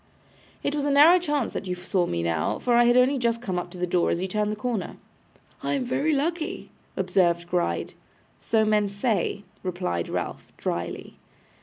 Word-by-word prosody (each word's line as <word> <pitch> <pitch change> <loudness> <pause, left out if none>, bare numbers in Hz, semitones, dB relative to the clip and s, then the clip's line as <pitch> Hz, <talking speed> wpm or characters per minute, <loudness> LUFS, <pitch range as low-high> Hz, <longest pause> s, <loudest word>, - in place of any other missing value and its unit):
'It 285 - 0
was 295 -1 -1
a 290 - +1
narrow 300 +6 +7
chance 295 -7 -1
that 195 - -4
you 180 - -2
saw 180 0 -1
me 85 0 -2
now, 85 -1 0
for 245 - 0
I 240 0 +6
had 240 +1 +5
only 260 +2 +4
just 230 -1 +1
come 190 -7 -2
up 175 - -6
to 180 - -11
the 180 - 0
door 175 0 +1
as - - 0
you 190 - -2
turned 210 +2 -1
the - - -2
corner.' 220 -1 -3 0.6
'I - - -1
am 265 -2 -1
very 265 +5 0
lucky,' 315 +3 -2 0.3
observed 180 -2 +2
Gride. 175 0 -1 0.5
'So 220 -1 +2
men 210 -1 +2
say,' 200 -1 -1 0.2
replied 175 - -2
Ralph, - - -4
drily. - - -4
210 Hz, 190 wpm, -25 LUFS, 180-255 Hz, 0.6 s, narrow